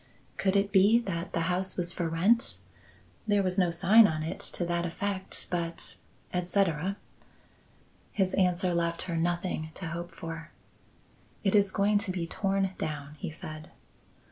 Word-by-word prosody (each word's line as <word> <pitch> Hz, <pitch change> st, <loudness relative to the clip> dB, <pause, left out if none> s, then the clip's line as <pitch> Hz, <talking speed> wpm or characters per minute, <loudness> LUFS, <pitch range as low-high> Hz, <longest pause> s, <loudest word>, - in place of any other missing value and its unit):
Could 190 Hz, 0 st, 0 dB
it 200 Hz, 0 st, +2 dB
be 200 Hz, +3 st, +6 dB
that 175 Hz, -5 st, -4 dB
the 165 Hz, -, 0 dB
house 180 Hz, +3 st, -1 dB
was 175 Hz, -1 st, -1 dB
for 170 Hz, -2 st, -2 dB
rent? 200 Hz, +9 st, +2 dB, 0.7 s
There 205 Hz, -1 st, +3 dB
was 185 Hz, +1 st, 0 dB
no 180 Hz, -2 st, +3 dB
sign 205 Hz, +6 st, +6 dB
on 155 Hz, -3 st, -2 dB
it 160 Hz, -, -4 dB, 0.2 s
to 175 Hz, -, -1 dB
that 170 Hz, 0 st, -1 dB
effect, 190 Hz, +3 st, -3 dB
but 170 Hz, -1 st, -3 dB, 0.4 s
etc. 180 Hz, 0 st, 0 dB, 1.1 s
His 190 Hz, -2 st, 0 dB
answer 180 Hz, -1 st, +2 dB
left 170 Hz, 0 st, 0 dB
her 175 Hz, -2 st, -3 dB
nothing 170 Hz, -1 st, -1 dB
to 180 Hz, -, -5 dB
hope 170 Hz, +1 st, -5 dB
for. 165 Hz, -1 st, -7 dB, 0.9 s
"It 195 Hz, -, +2 dB
is 200 Hz, -2 st, +5 dB
going 205 Hz, +1 st, +2 dB
to 200 Hz, -2 st, -3 dB
be 180 Hz, -2 st, -2 dB
torn 195 Hz, +2 st, 0 dB
down," 150 Hz, -1 st, -4 dB
he -, -, -4 dB
said. 155 Hz, -1 st, -8 dB
180 Hz, 155 wpm, -29 LUFS, 170-195 Hz, 1.1 s, be